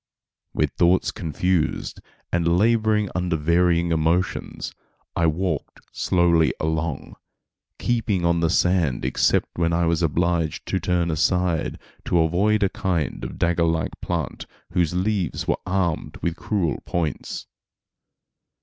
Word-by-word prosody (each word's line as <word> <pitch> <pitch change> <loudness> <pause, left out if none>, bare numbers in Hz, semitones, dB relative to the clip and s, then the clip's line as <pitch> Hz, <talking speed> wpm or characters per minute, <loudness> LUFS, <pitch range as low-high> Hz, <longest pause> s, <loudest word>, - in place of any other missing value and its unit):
With - - +1
thoughts 90 +2 +2
confused, 85 0 -1 0.3
and 85 0 +2
laboring 110 -1 +2
under 90 -2 0
varying 85 +2 +2
emotions, 80 +3 -1 0.4
I 85 -1 +2
walked 80 -1 -2
slowly 85 -3 +2
along, 80 -1 -2 0.6
keeping 110 -7 0
on 85 0 +3
the 85 -1 +2
sand 85 -7 +2
except - - +2
when 85 -1 +2
I 85 0 +2
was 85 +1 +1
obliged 85 0 0
to 95 - +1
turn 85 -2 0
aside 85 +1 +1 0.3
to 90 - +1
avoid 95 +6 +2
a 100 - +3
kind 85 -7 -2
of - - -6
dagger 85 0 +1
like 80 0 0
plant - - -3 0.2
whose 90 -1 +1
leaves 95 -4 -1
were - - +1
armed 90 -4 -1
with 85 -1 0
cruel 85 -5 -1
points. 80 -5 -3
85 Hz, 125 wpm, -23 LUFS, 80-90 Hz, 0.6 s, on